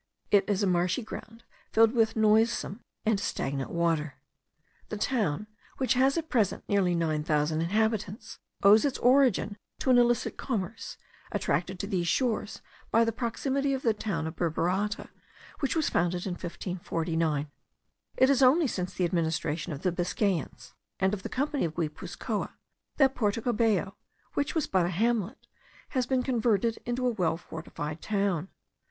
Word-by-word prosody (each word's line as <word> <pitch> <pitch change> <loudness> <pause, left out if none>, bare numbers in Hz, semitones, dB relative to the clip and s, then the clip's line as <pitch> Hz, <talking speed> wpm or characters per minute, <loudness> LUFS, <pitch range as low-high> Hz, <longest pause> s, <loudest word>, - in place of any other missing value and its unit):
It 200 -1 +4
is 205 0 +1
a - - +4
marshy 180 +5 +1
ground 225 +1 -9 0.3
filled 225 0 +5
with 225 -2 +2
noisome 220 -1 +2 0.3
and 215 -2 +2
stagnant 135 -8 -2
water. 165 -4 0 0.7
The 215 - -4
town, 210 - 0 0.3
which 260 - +2
has 265 +4 +3
at 325 -1 -2
present 230 - +1
nearly 190 -4 +2
nine 155 -3 0
thousand 155 0 +1
inhabitants, 215 +3 -1 0.2
owes 210 +2 +7
its 280 -2 0
origin 245 -5 +3 0.2
to 260 - +1
an 245 - +7
illicit 240 0 +2
commerce, 220 -4 -4 0.3
attracted 185 +1 -1
to 200 - -3
these 185 -4 -1
shores 225 -1 0 0.3
by 230 +1 +4
the 230 - +1
proximity 270 +4 -1
of 265 - -6
the 225 - +3
town 195 -6 -3
of 160 +1 -5
Burburata, 180 +5 -1 0.5
which 275 - 0
was 320 -2 +1
founded 175 +1 0
in 190 - -2
1549. 165 -4 -2 0.7
It 260 +1 +5
is 275 -1 +3
only 280 +6 +6
since 185 -8 -3
the 180 - +1
administration 165 -2 -1
of 145 -1 -6
the 180 - +2
Biscayans, 175 - -2 0.3
and 190 +1 +2
of 205 - -3
the - - -6
company 285 +2 -1
of 160 -2 -2
Guipuzcoa, 155 -3 -3 0.4
that 270 -2 +4
Porto 210 -3 0
Cabello, 215 -5 +1 0.4
which 285 +3 -1
was 320 - +1
but 185 -2 +1
a - - -1
hamlet, 220 +4 -1 0.4
has 255 -3 -1
been 255 -1 +1
converted 230 -3 +1
into 245 +1 -1
a 250 - +3
well 175 -7 0
fortified 160 -2 -7
town. 195 -4 -1
205 Hz, 160 wpm, -28 LUFS, 170-240 Hz, 0.7 s, owes